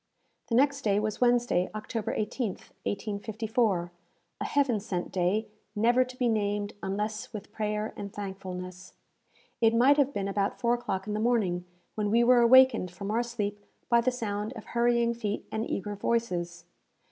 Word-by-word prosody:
The 230 Hz, -, +1 dB
next 280 Hz, +2 st, +3 dB
day 205 Hz, -4 st, +2 dB
was 215 Hz, +1 st, -3 dB
Wednesday, 240 Hz, -7 st, +3 dB
October 215 Hz, +1 st, -3 dB
18th, 215 Hz, -1 st, -3 dB, 0.2 s
1854 210 Hz, -2 st, -1 dB, 0.5 s
a -, -, -1 dB
heaven 270 Hz, -6 st, +2 dB
sent 190 Hz, -4 st, -4 dB
day, 190 Hz, +4 st, +1 dB, 0.3 s
never 240 Hz, +4 st, +4 dB
to 255 Hz, 0 st, -11 dB
be 250 Hz, -, +1 dB
named 205 Hz, -2 st, 0 dB
unless 210 Hz, +2 st, -3 dB
with 210 Hz, -1 st, -8 dB
prayer 210 Hz, 0 st, -2 dB
and 200 Hz, -1 st, -6 dB
thankfulness! 185 Hz, -2 st, -7 dB, 0.7 s
It 225 Hz, 0 st, +4 dB
might 265 Hz, +5 st, +5 dB
have 280 Hz, -1 st, +3 dB
been 200 Hz, -7 st, -2 dB
about 200 Hz, 0 st, -1 dB
four 235 Hz, 0 st, +2 dB
o'clock 195 Hz, -6 st, -2 dB
in 210 Hz, -, -3 dB
the 210 Hz, -, -1 dB
morning, 210 Hz, -7 st, +1 dB, 0.3 s
when 210 Hz, -1 st, -1 dB
we 235 Hz, +3 st, +4 dB
were 245 Hz, +1 st, +6 dB
awakened 260 Hz, -5 st, +6 dB
from 195 Hz, +3 st, -6 dB
our 230 Hz, +2 st, +2 dB
sleep 210 Hz, -4 st, -4 dB, 0.3 s
by 235 Hz, -1 st, +5 dB
the 245 Hz, -, +2 dB
sound 215 Hz, -2 st, -3 dB
of 225 Hz, -4 st, -9 dB
hurrying 235 Hz, 0 st, +2 dB
feet 215 Hz, -3 st, -3 dB
and 220 Hz, +2 st, -2 dB
eager 205 Hz, +2 st, -3 dB
voices. 175 Hz, -6 st, -2 dB
215 Hz, 165 wpm, -28 LUFS, 200-235 Hz, 0.7 s, were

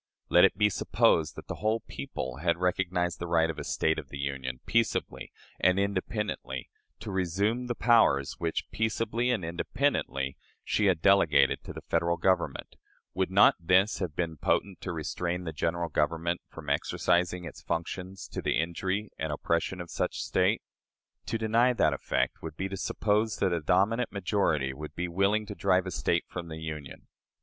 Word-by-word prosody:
Let -, -, +7 dB
it -, -, +1 dB
be 105 Hz, 0 st, +4 dB
supposed 95 Hz, -5 st, +2 dB
that -, -, -9 dB
the -, -, -5 dB
"whole 110 Hz, +1 st, +1 dB
people" 65 Hz, -1 st, -6 dB
had 85 Hz, +2 st, +1 dB
recognized 90 Hz, -2 st, 0 dB
the 85 Hz, -, -4 dB
right 80 Hz, -1 st, +3 dB
of 80 Hz, -, -9 dB
a -, -, -4 dB
State 80 Hz, 0 st, 0 dB
of 70 Hz, -4 st, -10 dB
the 70 Hz, -, -7 dB
Union, 70 Hz, -2 st, -3 dB
peaceably 115 Hz, 0 st, 0 dB, 0.3 s
and 90 Hz, +1 st, +3 dB
independently, 100 Hz, -, -2 dB, 0.3 s
to -, -, -5 dB
resume 100 Hz, +7 st, 0 dB
the 120 Hz, -, -2 dB
powers 110 Hz, -, +4 dB
which, 85 Hz, -1 st, -2 dB
peaceably 115 Hz, +2 st, 0 dB
and 110 Hz, -9 st, 0 dB
independently, 85 Hz, -, -1 dB, 0.3 s
she 105 Hz, -, +1 dB
had 90 Hz, -4 st, +1 dB
delegated 80 Hz, -9 st, +4 dB
to -, -, -6 dB
the -, -, -9 dB
Federal 85 Hz, 0 st, +1 dB
Government, 95 Hz, +3 st, 0 dB, 0.4 s
would 95 Hz, -1 st, 0 dB
not 100 Hz, +2 st, +6 dB
this 95 Hz, +5 st, +3 dB
have 85 Hz, -6 st, -3 dB
been 80 Hz, -2 st, -2 dB
potent 95 Hz, +5 st, 0 dB
to 95 Hz, -, -4 dB
restrain 85 Hz, +2 st, -3 dB
the 80 Hz, -2 st, -5 dB
General 85 Hz, +3 st, -1 dB
Government 85 Hz, +3 st, 0 dB
from -, -, -11 dB
exercising 90 Hz, +1 st, +1 dB
its -, -, -9 dB
functions 90 Hz, +3 st, -4 dB
to -, -, -4 dB
the -, -, 0 dB
injury 95 Hz, +6 st, -2 dB
and 80 Hz, -, -2 dB
oppression 85 Hz, +4 st, -1 dB
of 85 Hz, -1 st, -7 dB
such -, -, -2 dB
State? -, -, +1 dB, 0.6 s
To -, -, -1 dB
deny 115 Hz, +3 st, +3 dB
that 80 Hz, -10 st, +3 dB
effect 70 Hz, -, -1 dB
would 80 Hz, -1 st, -7 dB
be 95 Hz, -, -2 dB
to 95 Hz, -, -4 dB
suppose 105 Hz, +3 st, 0 dB
that 95 Hz, -3 st, +1 dB
a 85 Hz, -, -1 dB
dominant 100 Hz, +9 st, +2 dB
majority 90 Hz, -9 st, 0 dB
would 75 Hz, +2 st, -8 dB
be 85 Hz, +2 st, -2 dB
willing 100 Hz, +5 st, +1 dB
to 105 Hz, -, -6 dB
drive 95 Hz, -2 st, +2 dB
a 90 Hz, -, -4 dB
State -, -, 0 dB
from 85 Hz, -2 st, -6 dB
the 80 Hz, -1 st, -7 dB
Union. 75 Hz, -3 st, -7 dB
90 Hz, 175 wpm, -29 LUFS, 80-100 Hz, 0.6 s, Let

